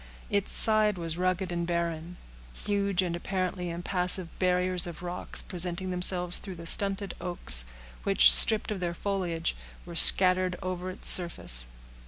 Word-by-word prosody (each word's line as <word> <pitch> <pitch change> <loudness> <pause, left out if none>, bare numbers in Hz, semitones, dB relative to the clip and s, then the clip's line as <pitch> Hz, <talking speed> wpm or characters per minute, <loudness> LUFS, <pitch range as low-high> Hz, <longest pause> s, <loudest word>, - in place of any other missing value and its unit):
Its 200 -1 -2
side 215 -2 +1
was 165 -2 -5
rugged 185 +1 -3
and 170 -1 -4
barren; 170 0 -5 0.5
huge 200 -2 -2
and 175 -2 -4
apparently 185 0 -5
impassable 180 +1 -1
barriers 180 -1 0
of 170 0 -11
rocks 180 0 -3
presenting 180 0 -2
themselves 180 0 +4
through 190 -3 -10
the 170 0 -12
stunted 195 +2 +3
oaks, - - 0 0.4
which, 195 -1 +4
stripped 220 -1 +5
of 205 - -5
their 175 -1 -5
foliage, 175 -4 -4 0.3
were 170 -1 -11
scattered 185 +1 +3
over 185 0 -6
its 185 - -5
surface. 60 - +3
180 Hz, 145 wpm, -26 LUFS, 170-190 Hz, 0.5 s, stripped